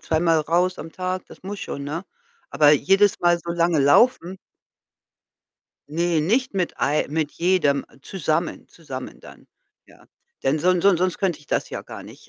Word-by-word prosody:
zweimal 165 0 +1
raus 175 +4 0
am 160 - -8
Tag, 185 0 -4
das - - -16
muss 200 +1 -6
schon, 140 - -6
ne? 165 +6 -5 0.5
Aber 150 -1 +5
jedes 195 +8 +3
Mal 175 0 +3
so 170 +1 -7
lange 170 -2 +1
laufen? 180 - +3 1.5
Ne, 170 0 0
nicht 240 - 0
mit 185 -3 -1
mit - - -18
ei 150 +2 +1
mit 155 -1 -2
jedem, 170 -6 +1
äh, - - -22
zusammen 165 -3 -3
zusammen 135 -6 -9
dann, - - -15 0.4
ja? - - -21 0.4
Denn 140 +3 +1
son 180 +2 +2
son 195 -4 +4
sonst 185 -1 0
könnte 180 -6 -1
ich 145 - -21
das - - -2
ja - - -5
gar - - -10
nicht. - - -15
170 Hz, 175 wpm, -22 LUFS, 155-185 Hz, 1.5 s, Aber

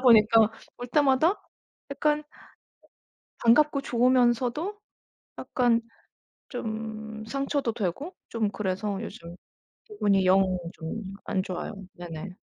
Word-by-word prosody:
보니까 225 -3 +6 0.3
올 245 0 -6
때마다 290 - +3 0.5
약간 300 +2 +1 1.2
반갑고 280 +5 +5
좋으면서도 250 - +2 0.6
약간 240 -2 +2 0.7
좀 220 -2 -5
상처도 275 -1 -1
되고 225 - -3
좀 220 -3 0
그래서 195 0 -2
요즘 170 +1 -8 0.5
기분이 205 - +1
영 190 +1 +6 0.3
좀 190 +4 -6
안 190 - 0
좋아요. 185 +3 -5 0.2
네네. 175 +1 -7
230 Hz, 200 characters per minute, -27 LUFS, 200-270 Hz, 1.2 s, 보니까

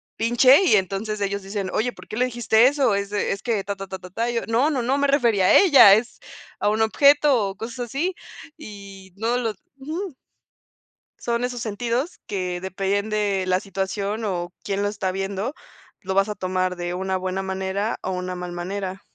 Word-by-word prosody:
pinche 255 +8 +5
y 345 - +5
entonces 200 +2 -1
ellos 200 0 -2
dicen 195 0 -4
oye, 245 +3 0
¿por - - -15
qué - - -7
le 250 +3 +2
dijiste 240 -1 +3
eso? 275 -6 +2
Es 200 0 -2
de 205 0 -1
es 200 - -7
que 225 -4 -1
ta 200 +1 -4
ta 195 0 -8
ta 190 - -6
ta 185 - -11
ta, 230 +6 -2
y 240 - -3
yo, 230 - +1
no 235 +6 +2
no 275 -5 -1
no 260 +4 +1
me 285 0 +2
refería 235 -9 +3
a - - +5
ella, 280 - +8
es 230 +3 -3 0.4
a - - +2
un 215 +1 0
objeto 280 -1 +4
o 195 - -8
cosas 240 +3 -5
así 310 +10 -2 0.4
y 200 -7 -11
no 230 +4 0
lo 230 -3 -1 0.2
ujú. 315 +5 -5 1.0
Son 235 0 -1
esos 245 -1 -3
sentidos 235 - -2
que 180 -3 -3
depende 200 +3 -2
de 200 -3 0
la 185 0 +2
situación 195 +3 -3
o 175 -3 -3
quién 200 0 -2
lo 205 - +1
está 200 -2 -2
viendo, 195 +6 -3 0.5
lo 190 0 -3
vas 195 +2 +3
a 210 - -3
tomar 185 -1 -1
de 175 0 -4
una 190 +1 -2
buena 185 +1 -3
manera 190 +3 -2
o - - -3
una 180 0 -4
mal 180 0 -6
manera. 190 +2 -5
205 Hz, 205 wpm, -23 LUFS, 190-240 Hz, 1.0 s, ella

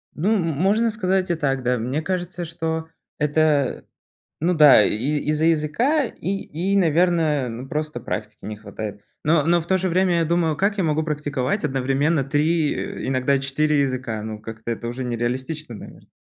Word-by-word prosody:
Ну, 200 +8 +1
м 200 - +1
можно 195 +9 +1
сказать 190 -3 0
и - - +1
так, 135 -4 -1
да. 125 0 +1
Мне 125 +7 -2
кажется, 180 0 -3
что 160 0 -3 0.3
это 150 -2 +1 0.6
ну 175 +3 +2
да, 150 -9 +8
и - - +1 0.4
из-за 155 +1 +1
языка 165 - +2
и 220 - -6 0.4
и - - +3
наверное, 165 -5 +2
ну 120 +3 -7
просто 150 -4 -3
практики 105 -2 -6
не 105 - -5
хватает. 105 0 -7 0.2
Но 155 -1 +3
но 170 +2 +3
в 160 - -9
то 190 +1 +2
же 185 +1 -1
время 180 0 +2
я 165 - +2
думаю: 165 -1 +1
"Как 200 +5 0
я 190 - +2
могу 155 0 +1
практиковать 150 +2 -2
одновременно 135 +2 +1
3, 150 +2 +1
э, - - -5
иногда 130 +1 +1
4 145 +2 +1
языка?" 130 -5 -2
Ну, 110 0 -6
как-то 110 +1 -7
это 115 0 -5
уже 125 +2 -4
не 120 -1 -2
реалистично, 130 +4 -3
навер - - -12
150 Hz, 180 wpm, -22 LUFS, 130-170 Hz, 0.6 s, да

